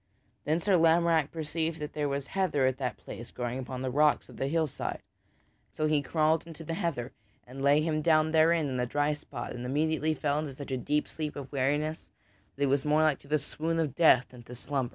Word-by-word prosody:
Then 155 +3 +1
Sir 190 +1 +3
Lamorack 165 -2 +3
perceived 160 0 -3
that 150 -1 -5
there 145 -1 -1
was 140 0 -2
heather 180 -6 0
at 130 +1 0
that 125 -2 -2
place 115 - -9
growing 125 +1 -4
upon 130 0 -5
the 130 - -1
rocks 150 +2 +2
of - - -13
the 135 - -1
hillside, 160 -1 -2 0.7
so 155 - -2
he 150 -1 +2
crawled 160 +2 +1
into 165 -1 -9
the 165 - -4
heather 165 -9 -2 0.3
and 130 +2 -9
lay 140 +2 +4
him 155 -1 0
down 155 0 +3
therein 160 -1 +4
in 130 -2 -2
a 125 - 0
dry 145 +3 +1
spot 150 - -7
and 120 - -6
immediately 155 +4 0
fell 145 -1 0
into 150 -3 -5
such 140 0 -8
a 130 - 0
deep 150 +4 0
sleep 155 -2 -5
of 140 -2 -7
weariness 145 +3 -1 0.5
that 140 - -2
it - - +5
was 135 0 +2
more 150 +1 +3
like 155 -3 +2
to - - -19
the 155 +2 +2
swoon 160 +3 -3
of 155 -5 0
death 130 -7 +5
than 125 -1 -12
to 120 +1 -11
slumber. 130 0 -2
150 Hz, 225 wpm, -29 LUFS, 135-160 Hz, 0.7 s, it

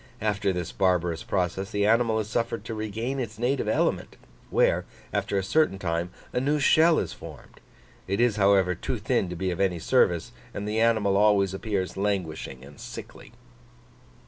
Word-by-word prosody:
After 105 -2 0
this 90 -2 -4
barbarous 90 -3 +1
process 95 +1 -2
the 105 -2 0
animal 115 +1 +3
is 105 - -3
suffered 115 +1 -2
to 115 - -5
regain 110 +5 -3
its 110 -4 -5
native 125 +4 0
element, - - 0 0.3
where, - - +2 0.3
after 100 - -1
a 95 - 0
certain 155 0 +2
time, 85 -2 -2 0.2
a - - +1
new 145 +3 +1
shell 160 +3 +5
is - - -2
formed; - - -12 0.5
it 100 +1 -1
is, 120 -3 +3
however, 95 -2 +4
too - - -4
thin 90 - 0
to 90 - -5
be 95 +2 -2
of 85 - -4
any 95 -3 +1
service, 80 - +2 0.2
and 105 0 -4
the 110 +1 -1
animal 110 -4 +3
always 100 -2 +3
appears 95 -2 -3
languishing 85 -9 -3
and 70 +1 -15
sickly." - - -10
100 Hz, 170 wpm, -26 LUFS, 95-115 Hz, 0.5 s, shell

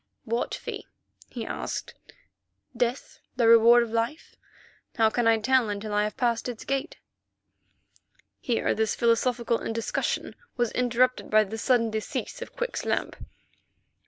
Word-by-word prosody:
"What 235 +1 -1
fee?" - - -7 0.4
he - - -6
asked. - - -5 0.8
"Death, 245 +2 -2 0.2
the 240 -2 +2
reward 230 +1 +7
of 230 - -6
Life? 230 +7 -3 0.6
How 220 -1 +3
can 240 0 +1
I 225 0 +5
tell 245 +1 +2
until 205 +1 -4
I 210 0 +2
have 210 - -5
passed 235 -1 0
its 235 -2 -7
gate?" 275 0 -2 1.4
Here 240 -2 0
this 220 0 0
philosophical 235 0 +1
discussion 230 0 -2 0.2
was 240 -2 +1
interrupted 250 +1 +1
by 215 0 +5
the 220 +2 -6
sudden 230 -2 +2
decease 220 - -4
of 485 - -8
Quick's - - -3
lamp. - - -1
230 Hz, 135 wpm, -26 LUFS, 220-245 Hz, 1.4 s, reward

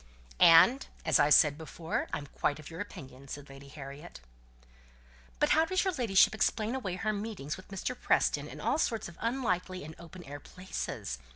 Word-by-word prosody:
"And, 235 +12 +7 0.2
as - - +4
I 145 - +4
said 150 -1 +5
before, 160 +1 -4
I'm 145 - -4
quite 145 +1 -1
of 155 +1 -11
your 165 +3 -6
opinion," 140 -9 -10
said 145 +1 -8
Lady 135 0 -12
Harriet. 140 +3 -10 1.2
"But - - +2
how 320 - +5
does 370 +2 +1
your 380 -1 0
ladyship 225 - +4
explain 220 +1 0
away 200 -9 -3
her 215 +4 -1
meetings 200 -9 -4
with 185 - -13
Mr. 200 +6 -4
Preston - - +1
in - - -10
all - - 0
sorts 225 -8 -1
of 170 - -13
unlikely 185 - -1
and 155 +2 -8
open 170 +1 -11
air 145 -1 -8
places?" 180 - -6
180 Hz, 180 wpm, -31 LUFS, 145-220 Hz, 1.2 s, And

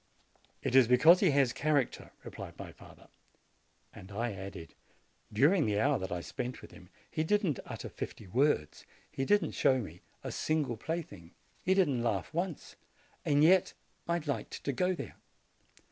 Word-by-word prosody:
"It - - -1
is 130 -3 +7
because 155 +9 +7
he 190 - +4
has 140 -3 +3
character," 145 -1 0
replied - - -9
my - - -8
father. - - -16 0.9
And 95 +2 -12
I 115 +3 -2
added, 95 -4 -8 0.6
"During 145 - +3
the 105 -1 +1
hour 140 +5 +2
that 95 - -5
I 90 0 -2
spent 125 +7 -5
with - - -12
him 90 -2 -15 0.2
he 155 - -1
did 205 +6 +2
not 155 -9 0
utter - - -6
fifty 110 - -7
words, 115 - 0 0.3
he 135 - -2
did 205 +7 +4
not - - -4
show 130 - +3
me 90 -8 -7 0.2
a - - -4
single 155 -6 -1
THE 110 - -19
BLACKSMITH'S 165 0 -2
SON - - -10
89 85 -1 -15
plaything, - - -32 0.3
he 190 - +2
did 190 -3 +4
not 120 -4 0
laugh 95 - -5
once; 175 -1 -4 0.5
yet 160 +6 +4 0.3
I 170 0 +1
liked 140 -9 -4
to 140 - -1
go 180 +8 +1
there." - - -8
135 Hz, 185 wpm, -31 LUFS, 105-160 Hz, 0.9 s, is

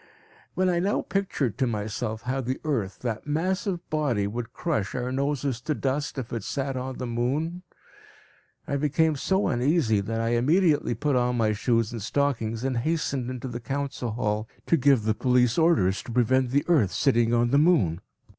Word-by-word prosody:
When 185 0 +2
I 175 -1 +2
now 195 +4 0
pictured 170 - -2
to 130 - +2
myself 110 0 -3
how 130 +2 -1
the 130 +1 -3
earth, 120 -11 -2
that 115 +1 -3
massive 180 +4 -1
body, 140 -10 +1
would 115 +3 -4
crush 135 - -2
our 125 0 -2
noses 135 -2 -1
to 155 +3 -2
dust, 140 +2 -2
if 125 -4 -5
it 115 -4 -3
sat 135 +2 -3
on 130 0 -4
the 125 - -4
moon, 135 +9 -1 1.1
I 140 - 0
became 150 +2 +2
so 190 +8 +1
uneasy, 120 - +2
that 115 +3 -3
I 115 0 0
immediately 145 +3 +2
put 145 +4 0
on 125 0 +1
my 110 -2 +2
shoes 115 +1 +1
and 115 -2 -5
stockings 115 -2 -1
and 130 -2 -1
hastened 140 -2 -1
into 130 0 -5
the 120 -1 -5
council 135 0 -3
hall 105 -1 -2 0.2
to - - +3
give 135 -5 +3
the 110 0 +2
police 125 +2 +2
orders 155 - +3
to - - -9
prevent 125 +2 +2
the 140 +3 +1
earth 145 - +3
sitting 120 +4 +2
on 120 0 +2
the 140 - +5
moon. 105 - +3
130 Hz, 185 wpm, -26 LUFS, 115-150 Hz, 1.1 s, the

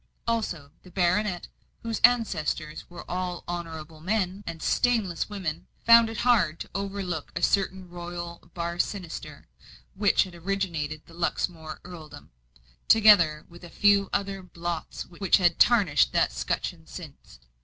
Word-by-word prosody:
Also 180 -11 -2
the 185 - -15
baronet, 180 +1 0 0.4
whose 230 -2 -2
ancestors 200 -10 +1
were 175 -1 -10
all 180 -1 -3
honourable 160 -2 -6
men 190 +1 -1
and 165 -1 -5
stainless 220 -9 +1
women, 185 -7 -4 0.2
found 230 -1 +8
it 225 - -6
hard 185 -11 +3
to - - -6
overlook 195 -4 -4
a - - -3
certain 190 -2 +1
royal 175 -1 -7
bar 170 0 -3
sinister, 180 -5 -4 0.5
which 205 +1 +3
had 185 - -10
originated 170 -4 -3
the 165 - -17
Luxmore 165 -2 -2
earldom, 155 - -11 0.6
together 180 -9 +6
with 170 +1 -15
a 175 - -9
few 200 +1 +3
other 195 -1 -2
blots 175 -2 -5
which 180 +1 +2
had 175 -3 +2
tarnished 200 -12 +4
that - - +3
scutcheon - - -3
since. 65 - -11
175 Hz, 135 wpm, -27 LUFS, 165-200 Hz, 0.6 s, found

